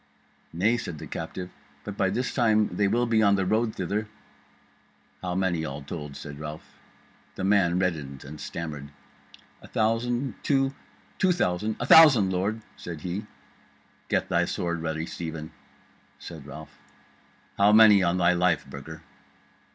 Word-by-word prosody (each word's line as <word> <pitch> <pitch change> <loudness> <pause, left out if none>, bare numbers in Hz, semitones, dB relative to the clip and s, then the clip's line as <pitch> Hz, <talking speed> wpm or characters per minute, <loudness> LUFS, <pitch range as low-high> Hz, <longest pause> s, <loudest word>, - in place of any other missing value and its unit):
"Nay," 105 +8 +2
said 90 -9 -6
the - - -8
captive, 90 +2 -6 0.3
"but 105 - -6
by 95 -2 +1
this 125 +6 -2
time 110 -4 +2
they 105 - +2
will 120 +4 +1
be 115 -2 +2
on 100 -2 +5
the 95 -1 0
road 110 +3 0
thither." 100 +4 -2 1.1
"How 90 -1 -3
many 90 -4 0
all 70 -2 -5
told?" 75 -1 -7
said 70 +1 -9
Ralph 75 0 -9 0.6
The - - -5
man 95 -3 +3
reddened 75 -7 -2
and 75 +2 -9
stammered: 75 -4 -6 0.7
"A - - -13
thousand 120 +4 -1
two 135 -1 +1 0.5
two 190 - +4
thousand 105 - 0
A 120 - -2
thousand, 135 -11 +7
lord," 105 +5 -1
said 80 -3 -7
he. 95 +5 -4 0.8
"Get - - +1
thy - - +2
sword 85 -1 -3
ready, 80 0 -3
Stephen," 80 -2 -6 0.7
said 80 -4 -10
Ralph. 75 +1 -11 0.8
"How 100 +1 +6
many, 105 -2 +7
on 90 0 +1
thy 90 0 +4
life, 90 0 +1
Burger?" - - -9
95 Hz, 150 wpm, -26 LUFS, 80-110 Hz, 1.1 s, thousand